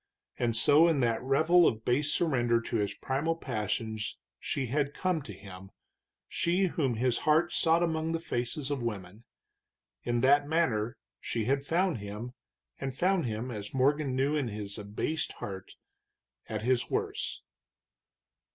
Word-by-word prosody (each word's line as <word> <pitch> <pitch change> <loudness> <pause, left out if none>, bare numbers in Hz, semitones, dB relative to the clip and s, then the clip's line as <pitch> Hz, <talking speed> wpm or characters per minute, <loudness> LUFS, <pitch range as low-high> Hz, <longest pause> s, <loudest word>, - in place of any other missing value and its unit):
And 115 -2 +1
so 145 +8 +6
in 160 -4 +2
that 115 -2 +1
revel 160 +7 +4
of 110 0 -1
base 145 +4 +2
surrender 120 -8 +2
to 115 - -3
his 105 -1 -1
primal 145 +8 -1
passions 110 -5 -3 0.2
she 135 - -2
had 140 +3 -1
come 185 -4 0
to 125 - -9
him, 95 -1 -11 0.6
she 175 +3 +1
whom 150 -9 0
his 120 +1 +1
heart 160 +3 +2
sought 165 +1 +3
among 160 -1 0
the 165 - -1
faces 135 0 -3
of 140 -3 -1
women; 105 -1 -5 0.8
in 120 -1 0
that 145 +2 +4
manner 120 -9 0 0.2
she 115 - -2
had 135 +4 0
found 175 - +1
him, 105 +4 -6 0.5
and 135 -1 -4
found 185 -5 +2
him, 115 +3 -3
as 105 +1 -6
Morgan 140 +1 +2
knew 140 +3 +1
in 145 -4 0
his 105 -1 -6
abased 105 +10 -2
heart, 95 -2 -8 0.7
at 110 -1 -3
his 125 0 +1
worst. - - -2
130 Hz, 150 wpm, -30 LUFS, 110-155 Hz, 0.8 s, so